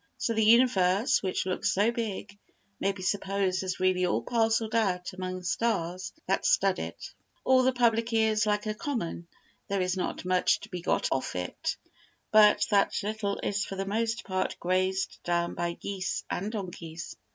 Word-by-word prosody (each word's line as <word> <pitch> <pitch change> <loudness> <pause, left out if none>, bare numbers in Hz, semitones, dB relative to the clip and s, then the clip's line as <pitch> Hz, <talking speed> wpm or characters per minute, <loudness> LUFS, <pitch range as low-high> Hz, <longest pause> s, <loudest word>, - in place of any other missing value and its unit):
So 230 - -1
the 220 0 +2
universe, 215 -3 +4
which 185 -2 -1
looks 185 -1 0
so 205 +4 +2
big, 220 -4 -4 0.4
may 195 - +1
be 190 -1 -9
supposed 195 -1 0
as 185 -1 -3
really 185 0 +2
all 180 - +1
parcelled 225 -2 +1
out 185 -6 0
among 185 0 -4
the 180 - -10
stars 185 -3 -1
that - - 0
stud - - +3
it. - - -7 0.3
Or 260 0 +5
the 255 +1 +3
public 235 -2 +2
ear 220 -1 +3
is 215 0 +1
like 210 0 +1
a 215 - -1
common; 215 - -4 0.4
there 200 0 -1
is 185 +1 0
not 185 - -3
much 185 0 +2
to - - -10
be 180 - -5
got - - +1
off 135 -7 -1
it, 90 -1 -3 0.5
but 210 -1 +6
that 200 -1 +3
little 210 -1 -2
is 205 0 0
for 195 - -6
the 195 0 -3
most 225 +3 -1
part 185 -1 -2
grazed 185 +1 0
down 170 0 0
by 170 0 -2
geese 195 +1 -4
and 200 +4 -2
donkeys. 170 -6 -6
195 Hz, 180 wpm, -28 LUFS, 185-220 Hz, 0.5 s, but